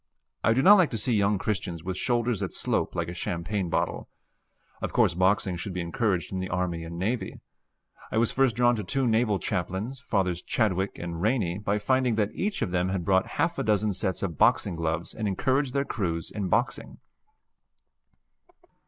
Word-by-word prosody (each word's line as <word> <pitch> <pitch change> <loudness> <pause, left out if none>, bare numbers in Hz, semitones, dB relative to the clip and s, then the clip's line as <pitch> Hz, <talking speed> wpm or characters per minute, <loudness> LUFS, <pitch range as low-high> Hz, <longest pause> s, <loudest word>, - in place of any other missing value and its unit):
I 110 - +4
do 130 +3 +2
not 205 +5 +9
like 175 - +4
to 115 - -3
see 115 +3 0
young 100 -1 +2
Christians 90 -5 -3
with 95 +1 -3
shoulders 120 0 0
that 100 -2 -4
slope - - -1
like 85 -1 -1
a 85 - -5
champagne 90 +2 -2
bottle. - - -1 0.7
Of - - -3
course - - +3
boxing 95 0 +2
should 90 +2 -5
be 90 - -3
encouraged 90 0 -1
in 95 - -2
the 95 0 -4
army 90 -2 -2
and 85 0 -7
navy. 110 +7 -2 0.7
I - - -1
was 115 0 +3
first 135 -4 +2
drawn 120 0 +4
to 105 - -3
two 135 +8 0
naval 110 -3 +2
chaplains, 100 +7 -3
Fathers 90 -4 0
Chidwick 95 -4 0
and 85 -1 -5
Rainey, 100 -5 0
by 105 0 0
finding 125 +2 +1
that 105 -1 0
each 200 0 -1
of - - -3
them 90 0 +1
had 95 -3 -2
bought 95 0 +3
half 170 +1 +1
a - - 0
dozen 105 -1 +1
sets 95 +1 -2
of 85 -6 -3
boxing - - +3
gloves 80 0 -2
and 110 -2 -3
encouraged 130 +7 0
their 140 0 +1
crews 85 - -2
in 100 -3 -3
boxing. 120 +7 -1
100 Hz, 190 wpm, -27 LUFS, 90-115 Hz, 0.7 s, not